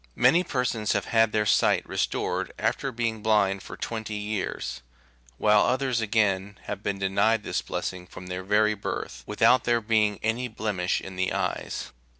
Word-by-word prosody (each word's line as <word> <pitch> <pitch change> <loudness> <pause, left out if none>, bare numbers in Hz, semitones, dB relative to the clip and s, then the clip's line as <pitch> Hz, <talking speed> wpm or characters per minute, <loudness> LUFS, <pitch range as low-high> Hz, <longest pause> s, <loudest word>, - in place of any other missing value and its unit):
Many 175 +2 +4
persons 125 - -1
have 100 - -1
had 115 -1 +3
their 105 0 +1
sight - - +3
restored - - -1
after 135 - -1
being 115 -2 -2
blind 100 -3 +2
for - - -9
twenty 110 -2 -4
years; 105 -1 -3 0.6
while 105 -1 +4
others, 130 -2 +1
again, 105 -2 +1
have 100 -1 -5
been 100 -1 -2
denied 100 +3 +2
this - - -1
blessing 90 -1 -4
from 90 - -10
their 90 0 -4
very 105 +3 +3
birth, 100 - -5
without 125 -1 +4
there 120 -1 +2
being 105 -2 +1
any 115 +3 0
blemish 105 -6 -1
in 95 -1 -9
the 95 0 0
eyes. - - -3
105 Hz, 160 wpm, -26 LUFS, 100-115 Hz, 0.6 s, Many